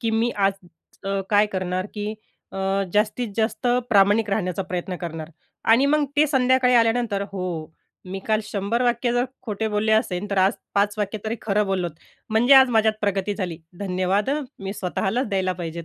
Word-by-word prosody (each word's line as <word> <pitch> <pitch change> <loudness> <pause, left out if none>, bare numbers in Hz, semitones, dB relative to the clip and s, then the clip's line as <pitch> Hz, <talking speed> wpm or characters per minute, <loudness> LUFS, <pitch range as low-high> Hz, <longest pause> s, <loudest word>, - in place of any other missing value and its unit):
की 230 -2 0
मी 225 +2 +1
आज 195 -1 +3 0.5
अ, 195 0 -1
काय 205 0 +5
करणार, 185 -1 -2
की 210 0 -3 0.4
अ, - - -7 0.4
जास्तीत 215 +3 +1
जास्त 225 +3 -1 0.2
प्रामाणिक 205 +1 +4
राहण्याचा 195 -2 -1
प्रयत्न 180 0 -4
करणार 165 -2 -6 0.4
आणि 260 +5 +5
मग 300 +1 +3
ते 300 +1 +5
संध्याकाळी 255 -2 +3
आल्यानंतर, 230 -3 +2
हो, 175 -4 -4 0.3
मी 190 +1 -5
काल 215 -1 +2
100 205 +4 -1
वाक्य 240 0 +1
जर 245 +1 +2 0.2
खोटे 220 -2 -2
बोलले 215 +1 +1
असेन, 205 -3 +1
तर 200 - 0
आज 190 +2 +4 0.2
5 205 +1 +2
वाक्य 210 +1 -2
तरी 225 +2 -2
खरं 210 0 +1
बोललोत, 185 -3 -1 0.4
म्हणजे 235 +5 +5
आज 265 -1 +7
माझ्यात 220 -1 +3
प्रगती 200 0 0
झाली, 180 -6 -4 0.2
धन्यवाद 190 +3 0 0.3
मी 195 0 -4
स्वतःलाच 200 +6 -1
द्यायला 190 -2 0
पाहिजेत. 170 -2 -6
205 Hz, 170 wpm, -23 LUFS, 190-225 Hz, 0.5 s, आज